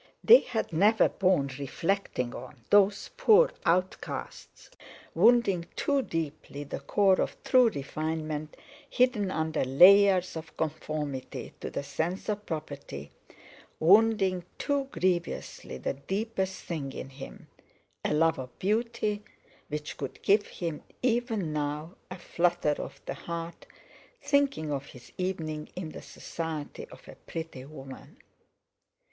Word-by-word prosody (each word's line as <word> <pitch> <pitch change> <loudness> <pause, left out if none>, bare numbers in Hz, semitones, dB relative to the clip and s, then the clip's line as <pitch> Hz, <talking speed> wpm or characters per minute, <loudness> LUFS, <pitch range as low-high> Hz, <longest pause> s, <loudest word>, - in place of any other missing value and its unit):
They 480 +2 +10
had 220 -7 -3
never 205 +7 +4
borne 180 -8 +1
reflecting 140 -3 -1
on, 130 -6 -10
those 205 0 +4
poor 460 +3 +6 0.2
outcasts; 180 +2 -2 0.4
wounding 225 -8 +4
too 280 -1 +1
deeply 155 - -4
the 145 - -6
core 195 -2 +3
of - - -2
true 255 -3 +5
refinement 155 -1 -4 0.3
hidden 240 -6 +2
under 160 -3 -1
layers 185 +7 +6
of 160 0 -8
conformity 150 -3 -4
to - - -5
the - - -4
sense 165 +8 -3
of 210 0 -3
property—wounding 175 - 0
too 285 -1 0
grievously 180 - -2
the - - -2
deepest 190 - -3
thing 145 -6 -4
in 135 - -7
him—a 135 0 -10
love 160 +1 +3
of 125 -1 -8
beauty 215 0 -1 0.4
which 150 0 -5
could 135 - -6
give 205 +1 +4
him, 165 -4 -5 0.2
even 230 -9 0
now, 150 +3 -3 0.2
a 185 - -7
flutter 175 -3 +1
of - - -7
the - - -3
heart, 170 0 -7 0.5
thinking 280 - +1
of 140 -1 -3
his 125 - -14
evening 160 -5 -3
in 180 -3 -5
the - - -9
society 160 -3 -6
of - - -15
a - - -10
pretty 160 -6 -6
woman. 135 -2 -11
170 Hz, 120 wpm, -29 LUFS, 150-205 Hz, 0.5 s, They